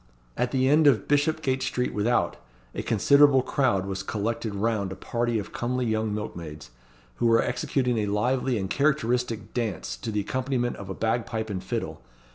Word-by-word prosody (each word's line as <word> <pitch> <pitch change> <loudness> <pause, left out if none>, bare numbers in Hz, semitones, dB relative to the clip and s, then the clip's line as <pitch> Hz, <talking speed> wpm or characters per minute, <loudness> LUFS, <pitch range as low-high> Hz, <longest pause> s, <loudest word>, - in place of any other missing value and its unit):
At 125 - 0
the 130 -1 +1
end 150 +2 +5
of 115 -8 +3
Bishopgate 145 -2 +1
Street 125 0 -1
Without 110 +4 +1 0.4
a - - -3
considerable 140 +4 +5
crowd 120 -11 +1
was 95 -1 -3
collected 110 +1 -3
round 100 -2 0
a - - -5
party 120 -1 -1
of 105 - -5
comely 125 +1 -1
young 110 -1 0
milkmaids, 85 -9 -6 0.5
who 120 - +2
were 115 0 +4
executing 125 -1 0
a 105 - -1
lively 125 +4 +1
and 95 -2 -2
characteristic 125 -4 0
dance 105 - -2
to 85 - -5
the 105 -1 0
accompaniment 125 +2 -1
of 100 -1 -8
a 95 - -4
bagpipe 110 -1 -1
and 95 -2 -4
fiddle. - - -4
115 Hz, 170 wpm, -26 LUFS, 105-130 Hz, 0.5 s, end